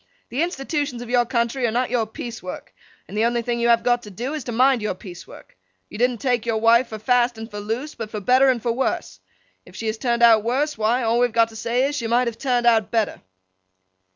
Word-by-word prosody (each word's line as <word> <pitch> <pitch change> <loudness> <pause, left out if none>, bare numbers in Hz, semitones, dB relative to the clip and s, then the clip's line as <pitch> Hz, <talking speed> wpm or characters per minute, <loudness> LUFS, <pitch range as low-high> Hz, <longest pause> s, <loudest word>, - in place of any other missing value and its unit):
The 260 - -2
institutions 290 -6 -2
of 240 - -9
your 245 -1 +3
country 235 +1 0
are - - -1
not 245 +1 -1
your 235 -3 0
piece 230 +1 -7
work, 180 - -8 0.3
and 200 - -9
the 215 - +1
only 235 0 0
thing 235 0 -2
you 235 - +1
have 235 -1 +4
got 245 -1 +2
to 210 - -11
do, 240 +9 -5
is, 305 -3 -4
to 240 - -4
mind 255 +1 +3
your 210 -3 -2
piece 180 -2 -11
work. - - -15 0.3
You - - -9
didn't 245 0 +2
take 245 -1 0
your 230 -2 -1
wife 230 +3 +4
for 220 - -7
fast 240 +1 +1
and 225 +1 -8
for 205 - -6
loose; 230 +8 -4
but 225 -3 -7
for 215 - -5
better 255 +4 +3
for 235 +1 -1
worse. 230 - -2 0.4
If 180 - -17
she 225 - -6
has 220 0 -2
turned 235 -2 0
out 225 -2 +6
worse—why, 245 -2 0
all 230 +1 +1
we 245 - +5
have 235 - -16
got 230 0 +3
to 225 - -14
say 235 +3 0
is, 290 +1 -2
she 235 - -3
might 240 +2 +2
have 230 -1 -5
turned 245 -3 0
out 225 -3 +3
better. 225 -3 -1
235 Hz, 250 wpm, -22 LUFS, 225-250 Hz, 0.4 s, out